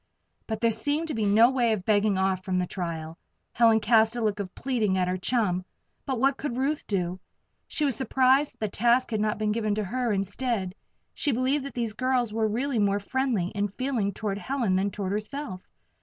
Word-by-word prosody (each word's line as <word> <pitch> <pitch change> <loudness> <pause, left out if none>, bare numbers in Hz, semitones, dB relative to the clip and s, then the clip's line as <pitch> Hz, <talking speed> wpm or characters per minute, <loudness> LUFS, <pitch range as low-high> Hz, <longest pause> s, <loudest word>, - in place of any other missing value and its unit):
But 220 0 -3
there 230 -1 +3
seemed 290 +9 -1
to - - -2
be 220 -2 -1
no 225 +5 +6
way 240 -4 +2
of 190 -4 -4
begging 205 -2 +2
off 190 -1 0
from 185 -1 -1
the 180 - +1
trial. 165 -3 -5 0.3
Helen 225 -2 +5
cast 220 +1 +3
a 240 - -2
look 210 -1 0
of 185 -2 -5
pleading 225 -7 0
at 180 -1 +1
her 180 - 0
chum; 185 -3 0 0.4
but 260 -3 -1
what 270 +2 +2
could 265 -5 -4
Ruth 285 +3 -1
do? 185 -2 -1 0.5
She 300 - -1
was 275 -4 +1
surprised 265 +2 +3
that - - -37
the 215 - +1
task 240 +5 +2
had 215 -2 0
not 215 0 0
been 215 0 0
given 215 -1 0
to 215 - -1
her 240 +4 -1
instead; 200 0 -2 0.4
she 290 - 0
believed 260 +3 0
that 275 - -7
these 230 -3 -2
girls 250 -1 0
were 220 0 +1
really 245 +3 -1
more 200 -1 +2
friendly 230 -4 -1
in 205 0 -1
feeling 230 -1 -1
toward 200 0 -3
Helen 240 -6 0
than 195 +2 +1
toward 195 -2 -4
herself. 210 -1 -4
220 Hz, 210 wpm, -27 LUFS, 200-255 Hz, 0.5 s, no